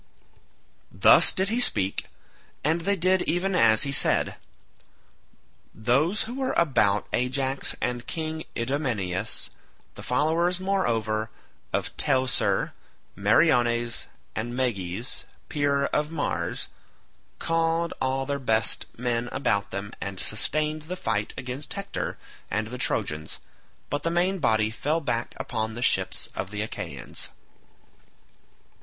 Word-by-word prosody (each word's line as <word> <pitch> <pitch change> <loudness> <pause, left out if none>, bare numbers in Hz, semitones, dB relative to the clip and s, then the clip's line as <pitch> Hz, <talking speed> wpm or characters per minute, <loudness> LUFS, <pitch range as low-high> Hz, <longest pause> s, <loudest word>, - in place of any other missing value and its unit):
Thus - - +7
did 190 +1 +1
he 230 +3 +1
speak, 100 - +2 0.6
and 160 +3 +2
they 200 +4 +1
did 185 +1 +3
even 185 +3 +1
as 110 - +5
he 140 - -1
had - - +7
said. - - +3 1.4
Those 140 - +2
who 225 +2 -6
were 265 0 -1
about 105 - +3
Ajax 130 +2 0
and 120 -1 -2
King 160 -1 -3 0.2
Idomeneus, 115 -7 -1 0.4
the - - -10
followers 165 +7 +1
moreover 115 - 0 0.4
of - - -2
Teucer, 130 -2 +2 0.4
Meriones, 120 - +3 0.3
and 120 +3 -3
Meges 115 -3 -2 0.2
peer 140 -2 +1
of 150 +1 0
Mars 160 -3 -2 0.7
called 165 0 +1
all 130 0 0
their 140 +1 -2
best 110 -4 +2
men 120 0 -1
about 100 -7 0
them 100 +1 -5
and 100 -1 -4
sustained 155 +7 +1
the 175 +4 -5
fight 110 - -1
against 130 +3 -4
Hector 200 0 -4 0.3
and 110 +2 -1
the 125 +1 -6
Trojans, 75 -9 -1 0.5
but 145 +2 -1
the 165 - 0
main 180 +3 +1
body 110 -6 +2
fell 150 +8 0
back 120 -6 -2
upon 110 -2 -3
the 120 - -3
ships - - +2
of 95 0 -3
the 105 +1 -3
Achaeans. 110 - -7
130 Hz, 125 wpm, -26 LUFS, 110-160 Hz, 1.4 s, Thus